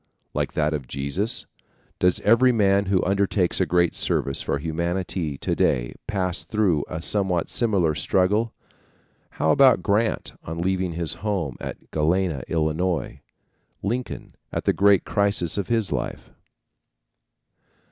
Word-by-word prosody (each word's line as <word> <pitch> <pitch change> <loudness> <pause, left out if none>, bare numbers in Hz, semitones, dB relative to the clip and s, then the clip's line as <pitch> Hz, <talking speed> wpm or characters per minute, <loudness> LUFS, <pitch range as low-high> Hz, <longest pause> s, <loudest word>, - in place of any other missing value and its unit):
Like - - -2
that 75 0 +1
of 70 -5 -4
Jesus? 70 - -2 0.5
Does 90 0 +3
every 115 +4 +5
man 100 -3 +2
who 95 -1 +2
undertakes 95 -1 +1
a 95 - +2
great 85 +1 +2
service 70 - 0
for - - -1
humanity 85 0 -2
to - - -2
day - - +1
pass 95 -4 -1
through 95 -9 +1
a 80 +1 -5
somewhat 95 -4 0
similar 100 -9 +2
struggle? 95 +8 +1 0.9
How 80 - +2
about 135 - +5
Grant 110 +2 0
on 80 +1 -6
leaving 90 0 0
his 80 -1 -1
home 95 - -2
at - - -8
Galena, 80 -1 +1
Illinois? 80 0 -1 0.6
Lincoln 120 +5 -4 0.2
at - - -3
the - - +2
great 100 -1 +4
crisis 100 -5 0
of 100 - -2
his 115 -3 0
life? 65 -3 -4
90 Hz, 135 wpm, -24 LUFS, 80-100 Hz, 0.9 s, every